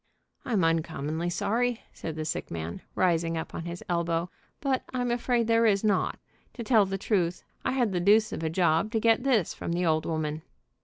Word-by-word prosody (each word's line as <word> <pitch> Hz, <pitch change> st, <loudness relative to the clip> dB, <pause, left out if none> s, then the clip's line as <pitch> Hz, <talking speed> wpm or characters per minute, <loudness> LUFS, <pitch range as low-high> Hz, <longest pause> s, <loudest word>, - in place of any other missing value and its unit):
"I'm 215 Hz, -8 st, +1 dB
uncommonly 165 Hz, 0 st, 0 dB
sorry," 235 Hz, +6 st, 0 dB
said 160 Hz, -, -6 dB
the 155 Hz, -1 st, -4 dB
sick 155 Hz, -, -3 dB
man, 85 Hz, 0 st, -5 dB
rising 165 Hz, -2 st, +1 dB
up 160 Hz, -, -5 dB
on 165 Hz, -, -5 dB
his 170 Hz, +1 st, -6 dB
elbow, 170 Hz, 0 st, 0 dB, 0.3 s
"but 270 Hz, -2 st, 0 dB
I'm 245 Hz, -1 st, 0 dB
afraid 240 Hz, 0 st, +1 dB
there 230 Hz, 0 st, +4 dB
is 200 Hz, -1 st, +2 dB
not. 205 Hz, -3 st, +1 dB, 0.4 s
To 235 Hz, -, -5 dB
tell 220 Hz, -3 st, +4 dB
the 195 Hz, 0 st, -2 dB
truth, 180 Hz, -4 st, 0 dB, 0.2 s
I -, -, 0 dB
had 245 Hz, -5 st, +1 dB
the 180 Hz, -, 0 dB
deuce 210 Hz, +4 st, +4 dB
of -, -, -4 dB
a 160 Hz, -, -1 dB
job 170 Hz, +4 st, +2 dB
to 225 Hz, -, +2 dB
get 225 Hz, +1 st, +3 dB
this 245 Hz, -8 st, +2 dB
from 170 Hz, -, -4 dB
the 175 Hz, +1 st, 0 dB
old 155 Hz, -1 st, +1 dB
woman." 155 Hz, -1 st, -2 dB
180 Hz, 200 wpm, -28 LUFS, 165-225 Hz, 0.4 s, there